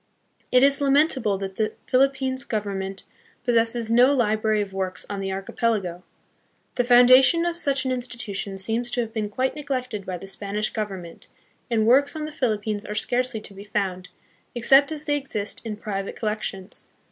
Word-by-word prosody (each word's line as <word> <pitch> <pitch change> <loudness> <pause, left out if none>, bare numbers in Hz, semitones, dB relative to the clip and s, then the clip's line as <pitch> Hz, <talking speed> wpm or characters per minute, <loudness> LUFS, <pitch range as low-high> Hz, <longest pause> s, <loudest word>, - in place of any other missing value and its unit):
It 255 +1 +5
is 280 +1 +4
lamentable 275 -7 +3
that 195 0 -6
the 215 -1 0
Philippines 265 0 +1
Government 195 -3 -4 0.4
pos 240 - +2
sesses 230 0 +2
no 245 +4 +6
library 220 -4 +1
of 200 -2 -3
works 190 -1 -3
on 200 - -3
the 195 0 -3
Archipelago. 195 0 -1
1 175 +1 -13 0.7
The 245 - +1
foun 245 0 +6
dation 265 +7 +6
of 340 - -1
such 280 -5 0
an 260 - 0
institution 235 -6 -3
seems 225 +5 -1
to 245 - 0
have 225 -1 -5
been 215 -2 -2
quite 260 +5 -1
neglected 255 -8 -4
by 185 -1 -3
the 195 - -10
Spanish 205 +2 -3
Government, 195 -6 -6 0.4
and 225 -2 +2
works 280 +6 +4
on 310 -1 -3
the 305 - -6
Philippines 215 -6 -1
are 210 - -6
scarcely 245 0 -1
to 200 - -8
be 195 +1 -10
found, 195 -3 -3 0.5
except 270 +5 +5
as 305 -1 -4
they 290 - +1
exist 215 -7 -4
in 220 -3 -5
private 195 -2 -4
collections. 210 -3 -4
225 Hz, 180 wpm, -24 LUFS, 200-260 Hz, 0.7 s, no